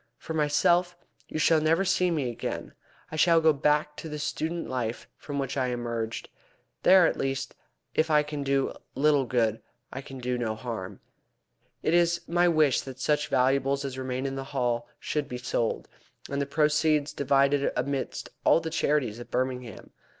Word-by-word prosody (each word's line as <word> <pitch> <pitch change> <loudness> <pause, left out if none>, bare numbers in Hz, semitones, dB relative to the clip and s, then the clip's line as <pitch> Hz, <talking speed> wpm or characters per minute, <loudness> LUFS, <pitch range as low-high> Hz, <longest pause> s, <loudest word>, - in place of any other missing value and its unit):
For 160 - -7
myself, 170 +4 +2 0.3
you - - -5
shall 155 0 +4
never 165 +5 +2
see 180 -1 +2
me 145 -7 -1
again. 115 - -5 0.4
I - - -5
shall 165 +1 +5
go 160 -1 +4
back 150 +1 +1
to 160 - -7
the 150 - -5
student 160 +3 -3
life 120 -3 -3
from 145 -1 -6
which 135 -2 -2
I 130 -1 +1
emerged. 115 -2 -3 0.5
There, 185 -1 +7
at - - +1
least, 135 0 -2 0.4
if 160 +1 +1
I 150 -1 +4
can 150 -1 -5
do 135 -1 0 0.2
little 145 -1 +3
good, 115 -3 0 0.3
I 135 - -5
can 135 0 -10
do 125 0 -2
no 110 -2 -1
harm. 110 -5 -6 0.8
It 160 - +1
is 170 0 +3
my 175 +1 +3
wish 155 -5 +3
that 130 -1 -9
such 150 +3 +1
valuables 135 +2 +1
as 135 -2 -4
remain 130 0 -3
in 135 0 -2
the 135 - -4
Hall 120 -3 -1
should 150 -2 -2
be 125 - -4
sold, 120 -2 -2 0.4
and 140 0 -1
the 140 - -2
proceeds 150 0 +2
divided 140 0 +2
amidst 140 -1 -3
all - - +5
the 160 -1 -5
charities 130 -9 0
of 120 - -9
Birmingham. 125 -2 -3
140 Hz, 175 wpm, -27 LUFS, 125-155 Hz, 0.8 s, There